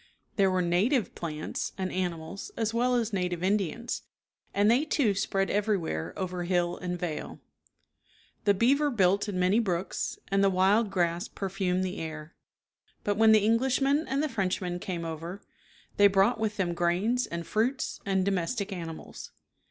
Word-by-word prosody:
There 195 -3 +4
were 185 -1 +1
native 195 +7 +1
plants 155 -2 -4
and 185 -1 -2
animals 175 0 -4
as 225 -1 0
well 245 +2 +2
as 230 -3 0
native 180 -2 -1
Indians, 205 +4 -1 0.5
and 205 +2 +3
they, 250 +5 +3
too, 285 -8 +2
spread 195 0 0
everywhere 200 - -1
over 180 -1 -3
hill 175 -1 +1
and 180 0 -4
vale. 165 -3 -4 1.1
The 200 -1 +4
beaver 275 +8 +3
built 200 -3 +2
in 195 - -3
many 185 +5 +3
brooks, 185 -4 -2
and 195 0 +2
the 195 - +5
wild 195 +4 +3
grass 175 -2 0
perfumed 185 -1 -1
the 185 0 -3
air. 155 0 -6 0.7
But 205 - 0
when 220 0 +6
the 215 -2 +5
Eng 225 +1 +4
lishmen 275 +4 +2
and 275 +3 0
the - - +1
Frenchmen 185 -6 -2
came 175 -2 -4
over, 165 +4 -6 0.5
they 205 - +8
brought 200 +4 +3
with 215 -1 -1
them 180 -3 0
grains 185 +9 +1
and 170 0 -5
fruits 240 +5 -1
and 190 -2 +1
domestic 200 +2 -1
animals. 165 -3 -7
195 Hz, 160 wpm, -28 LUFS, 175-220 Hz, 1.1 s, they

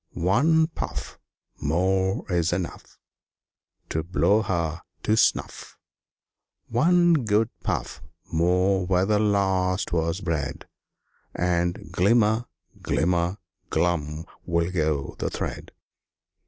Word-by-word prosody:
"One 150 - +3
puff 160 - -6 0.4
More's 90 +2 +1
enough 85 -1 -5 0.9
To 80 - -1
blow 95 +5 +2
her 85 -5 -2 0.2
to 110 - +2
snuff! - - 0 0.9
One 175 +8 +4
good 110 +1 +2
puff - - -3 0.3
more 90 +3 +2
where 90 0 +2
the 105 0 +2
last 95 -3 +1
was 85 +2 0
bred, 80 -6 -3 0.7
And 85 -1 -1
glimmer, 110 +5 +3 0.4
glimmer, 85 +3 0 0.3
glum 80 -2 -1 0.2
will 85 0 0
go 75 -5 -1
the - - -1
thread!" - - -5
90 Hz, 95 wpm, -25 LUFS, 85-105 Hz, 0.9 s, One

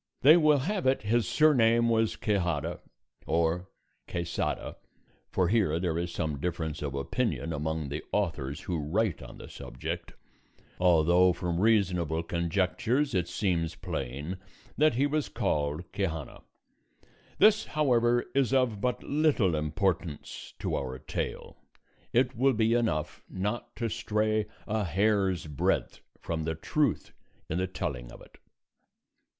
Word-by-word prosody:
They 150 +5 +9
will 155 -3 +5
have 180 +3 -1
it 130 -3 +2
his 115 +2 +1
surname 120 -6 +4
was 115 -1 +2
Quixada 85 -6 -1 0.5
or 85 +3 +1 0.4
Quesada 85 -1 -3 0.5
(for 90 -2 +1
here 95 -7 +2
there 85 -2 -1
is 85 +1 -2
some 80 -5 -2
difference 80 -2 -3
of 70 -2 -3
opinion 85 - -1
among 80 0 -2
the 75 +2 -4
authors 75 -9 -1
who 85 -3 -2
write 85 +3 0
on - - -10
the - - -10
subject), - - -6 0.7
although 90 +1 +5
from 85 -1 -2
reasonable 90 -7 +2
conjectures 95 - 0
it 90 -2 +1
seems 90 -3 -1
plain 70 +8 -4 0.4
that 155 -2 +3
he 135 +4 +3
was 150 0 -1
called 75 +2 -1
Quixana. 80 -7 -3 1.0
This, 215 +1 +5
however, 120 -5 +2
is 135 -4 +2
of 120 -6 +1
but 125 +1 -1
little 140 - +2
importance 75 +1 -2
to - - -2
our 65 -1 -3
tale; - - -5 0.5
it 125 +1 +2
will 135 +3 +3
be 110 0 +2
enough 75 -11 0
not 105 +5 -3
to 115 - -2
stray 110 0 0 0.2
a 110 0 -1
hair's 95 0 +1
breadth 75 -3 -1 0.2
from 80 -1 -3
the 80 0 -1
truth 140 - -1 0.3
in 80 - -2
the 95 - 0
telling 60 -9 -4
of - - -12
it. - - -17
95 Hz, 135 wpm, -29 LUFS, 80-115 Hz, 1.0 s, They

